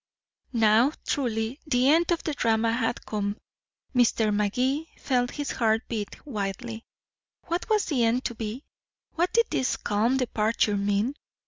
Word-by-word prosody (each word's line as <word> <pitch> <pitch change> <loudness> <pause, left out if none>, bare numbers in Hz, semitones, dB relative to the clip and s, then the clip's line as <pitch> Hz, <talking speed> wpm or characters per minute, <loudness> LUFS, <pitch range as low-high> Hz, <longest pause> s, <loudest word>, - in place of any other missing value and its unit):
Now, 225 +4 +4
truly, 235 -1 -1
the 250 -2 +3
end 325 +4 +4
of 340 - 0
the 310 - -2
drama 225 -3 +2
had 230 0 -1
come. 205 -1 -2 0.6
Mr. 230 -4 +3
Magee 250 +9 0
felt 245 -2 0
his 290 +1 -4
heart 225 -1 +1
beat 215 +2 -5
wildly. 225 -1 -4 0.6
What 345 +5 -3
was 430 -2 +3
the 260 -6 +1
end 235 +3 +1
to 240 - -1
be? 225 +4 -5 0.5
What 350 +2 +1
did 465 +3 +4
this 260 - 0
calm 225 +6 +1
departure 220 -4 +1
mean? 205 +5 0
235 Hz, 145 wpm, -26 LUFS, 220-270 Hz, 0.6 s, Now